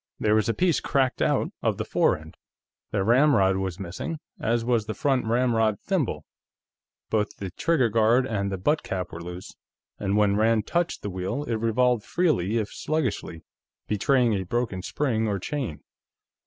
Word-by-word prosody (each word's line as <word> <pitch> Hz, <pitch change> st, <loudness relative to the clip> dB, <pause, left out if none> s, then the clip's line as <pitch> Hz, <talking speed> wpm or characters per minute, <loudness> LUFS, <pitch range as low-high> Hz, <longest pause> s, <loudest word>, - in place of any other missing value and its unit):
There 105 Hz, -1 st, +2 dB
was 110 Hz, +1 st, +2 dB
a 115 Hz, -, +1 dB
piece 180 Hz, -3 st, +2 dB
cracked 135 Hz, -2 st, 0 dB
out -, -, +1 dB
of -, -, 0 dB
the -, -, -3 dB
fore -, -, +2 dB
end, 80 Hz, +1 st, -13 dB, 0.5 s
the 100 Hz, -2 st, 0 dB
ramrod 115 Hz, -5 st, +4 dB
was 95 Hz, -1 st, -3 dB
missing, 95 Hz, -, -5 dB, 0.2 s
as 115 Hz, 0 st, 0 dB
was 115 Hz, -3 st, +1 dB
the 110 Hz, -, -3 dB
front 135 Hz, -6 st, +1 dB
ramrod 115 Hz, -3 st, +2 dB
thimble, 145 Hz, -, -1 dB, 0.9 s
both 105 Hz, -2 st, 0 dB
the 95 Hz, -2 st, -5 dB
trigger 145 Hz, -, +2 dB
guard 115 Hz, +3 st, +3 dB
and 100 Hz, -5 st, -2 dB
the 95 Hz, -, -2 dB
butt 150 Hz, +12 st, +1 dB
cap 90 Hz, -2 st, -4 dB
were 85 Hz, -, -7 dB
loose, 90 Hz, +1 st, -8 dB, 0.5 s
and 100 Hz, 0 st, 0 dB
when 105 Hz, -1 st, +3 dB
Rand 110 Hz, 0 st, +2 dB
touched 170 Hz, -1 st, -1 dB
the 105 Hz, -, -3 dB
wheel, 95 Hz, +10 st, -3 dB
it 115 Hz, -6 st, -2 dB
revolved 115 Hz, 0 st, +2 dB
freely 115 Hz, -, +1 dB
if 105 Hz, -2 st, -2 dB
sluggishly, 130 Hz, -, -2 dB, 0.4 s
betraying 120 Hz, +2 st, +2 dB
a 100 Hz, -, 0 dB
broken 100 Hz, 0 st, -2 dB
spring 110 Hz, 0 st, -1 dB
or 100 Hz, -2 st, 0 dB
chain. 115 Hz, -, -4 dB
110 Hz, 170 wpm, -26 LUFS, 100-130 Hz, 0.9 s, ramrod